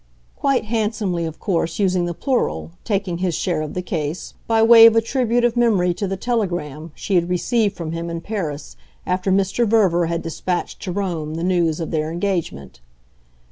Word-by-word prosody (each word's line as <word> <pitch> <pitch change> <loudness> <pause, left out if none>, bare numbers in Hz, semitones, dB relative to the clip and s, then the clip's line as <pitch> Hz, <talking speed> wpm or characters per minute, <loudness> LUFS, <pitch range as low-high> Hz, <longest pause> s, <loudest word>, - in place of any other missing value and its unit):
quite 275 -5 +1
handsomely 210 -6 -1
of 160 -1 -6
course 170 -5 -1
using 185 -3 +1
the 175 - -3
plural, 255 - -1
taking 195 -5 -2
his 180 -3 0
share 170 -4 -1
of 155 - -5
the 180 - -2
case, 160 -2 -4
by 225 -1 +2
way 230 0 +9
of 230 - +4
a - - +6
tribute 240 0 0
of 240 -1 +1
memory 205 -7 +3
to 200 +3 -3
the 195 +1 -3
telegram 175 - -2
she 200 - -4
had 175 -1 +2
received 205 +3 0
from 165 -2 -4
him 165 +1 -4
in 170 0 -4
Paris 165 -7 -5 0.3
after 185 +1 0
Mr. 195 +4 +2
Verver 190 -6 +3
had 170 0 -2
despatched 175 +2 -3
to 185 - -4
Rome 170 -5 -3
the 165 - -4
news 175 -3 +1
of 165 - -4
their 155 0 -1
engagement. 170 - -3
180 Hz, 185 wpm, -21 LUFS, 165-215 Hz, 0.3 s, way